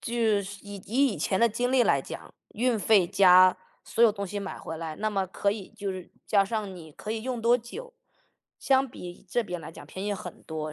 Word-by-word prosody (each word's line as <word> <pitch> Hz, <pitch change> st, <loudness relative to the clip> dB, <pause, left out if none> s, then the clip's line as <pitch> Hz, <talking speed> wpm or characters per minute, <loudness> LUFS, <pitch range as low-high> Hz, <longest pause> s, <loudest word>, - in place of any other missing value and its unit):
就 235 Hz, -, -5 dB, 0.3 s
是 200 Hz, 0 st, -8 dB
以 205 Hz, 0 st, -7 dB
以 255 Hz, 0 st, +2 dB
前 190 Hz, -, 0 dB
的 235 Hz, -, +6 dB
经 245 Hz, +3 st, -1 dB
历 260 Hz, -2 st, +5 dB
来 -, -, +3 dB
讲， -, -, -9 dB, 0.2 s
运 240 Hz, 0 st, +1 dB
费 205 Hz, -2 st, +5 dB
加 185 Hz, 0 st, +6 dB, 0.3 s
所 230 Hz, -, 0 dB
有 225 Hz, -3 st, +7 dB
东 200 Hz, -1 st, -4 dB
西 205 Hz, +2 st, -4 dB
买 200 Hz, -1 st, -5 dB
回 160 Hz, -, -7 dB
来， 160 Hz, -1 st, -5 dB
那 215 Hz, +7 st, -2 dB
么 195 Hz, -2 st, 0 dB
可 200 Hz, +2 st, 0 dB
以 200 Hz, -2 st, -6 dB
就 200 Hz, -1 st, -4 dB
是 185 Hz, -2 st, -7 dB, 0.2 s
加 200 Hz, -2 st, +3 dB
上 205 Hz, -2 st, -3 dB
你 160 Hz, -3 st, -12 dB
可 210 Hz, -, -8 dB
以 220 Hz, 0 st, -2 dB
用 250 Hz, -3 st, -3 dB
多 240 Hz, +2 st, +4 dB
久， 460 Hz, -, -9 dB, 0.7 s
相 270 Hz, 0 st, +3 dB
比 180 Hz, -4 st, -10 dB
这 240 Hz, +6 st, +1 dB
边 180 Hz, -5 st, -5 dB
来 165 Hz, -, -9 dB
讲 -, -, -11 dB
便 190 Hz, +2 st, -6 dB
宜 205 Hz, -, 0 dB
很 180 Hz, -3 st, -9 dB
多， 155 Hz, -1 st, -5 dB
205 Hz, 245 characters per minute, -27 LUFS, 185-230 Hz, 0.7 s, 有